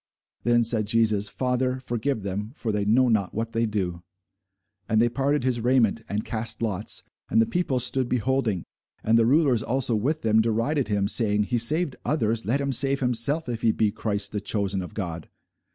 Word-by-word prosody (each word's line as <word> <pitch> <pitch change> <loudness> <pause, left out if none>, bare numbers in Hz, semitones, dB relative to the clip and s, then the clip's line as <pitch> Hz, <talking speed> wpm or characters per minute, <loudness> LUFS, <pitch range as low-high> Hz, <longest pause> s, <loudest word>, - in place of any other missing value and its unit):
Then 120 0 +2
said 110 -2 +2
Jesus, 110 -2 +2
Father, 125 0 -1
forgive 120 -2 -3
them; 100 +4 -4
for 115 - -3
they 105 -1 -1
know 125 +5 +3
not 105 -5 0
what 115 +1 -3
they 115 0 0
do. 90 -5 -3 0.9
And 110 - +2
they 120 +1 +3
parted 140 +3 0
his 125 -2 0
raiment, 120 -2 +2
and 105 +1 -3
cast 115 +1 -2
lots. 105 -2 -2 0.3
And - - +2
the 115 - +4
people 140 -3 -1
stood 125 0 +1
beholding. 125 -6 0 0.4
And 110 - +2
the 115 - +3
rulers 135 -4 +3
also 120 +1 0
with 145 +9 -1
them 110 0 +3
derided 115 +5 0
him, 100 -1 0
saying, 105 -1 +2
He 120 +3 -1
saved 150 +5 +3
others; 115 -6 -1
let 130 +6 +1
him 140 -1 -1
save 135 +2 +2
himself, 125 +5 +1
if 115 -2 -4
he 115 - +3
be 110 -1 0
Christ, 100 -1 -2
the 105 - -3
chosen 100 -2 -1
of 90 +4 -9
God. 85 -6 -5
115 Hz, 190 wpm, -25 LUFS, 105-130 Hz, 0.9 s, the